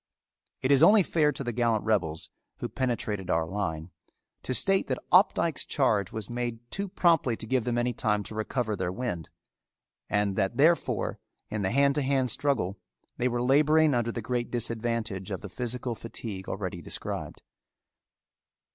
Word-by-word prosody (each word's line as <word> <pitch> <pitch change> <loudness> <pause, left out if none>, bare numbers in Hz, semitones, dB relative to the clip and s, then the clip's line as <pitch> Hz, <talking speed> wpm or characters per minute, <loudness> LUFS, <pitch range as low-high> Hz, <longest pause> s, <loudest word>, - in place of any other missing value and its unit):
It 130 - +2
is 140 0 +6
only 205 +4 +7
fair 155 -3 +2
to 140 - -5
the 120 - -2
gallant 115 -2 +1
rebels, 90 -8 -1 0.3
who - - -4
penetrated 110 -7 -2
our 80 0 +2
line, 85 -3 -4 0.5
to - - -5
state 195 +9 +4
that - - -1
Opdycke's 175 -4 +4
charge 105 - +1
was 110 -2 -5
made 120 -1 -3
too 200 +1 -2
promptly 165 -10 +2
to - - -6
give 125 0 0
them 120 -1 0
any 120 0 +1
time 105 -2 0
to 110 - -8
recover 110 0 -2
their 90 - -2
wind, 90 - -4 0.8
and 105 -1 +1
that 95 -2 0
therefore 165 +4 +2 0.3
in 105 -1 -2
the 95 - 0
hand 140 +4 +3
to 150 - 0
hand 130 -2 +1
struggle, 105 -10 0 0.4
they 125 - +1
were 120 -1 -1
laboring 150 +3 +4
under 120 -1 0
the 115 -1 -5
great 120 +1 -2
disadvantage 115 -4 -2
of 95 -3 -4
the 105 - -7
physical 125 +3 -3
fatigue 110 -4 -7
already 95 -3 -4
described. - - -4
120 Hz, 165 wpm, -28 LUFS, 105-135 Hz, 0.8 s, only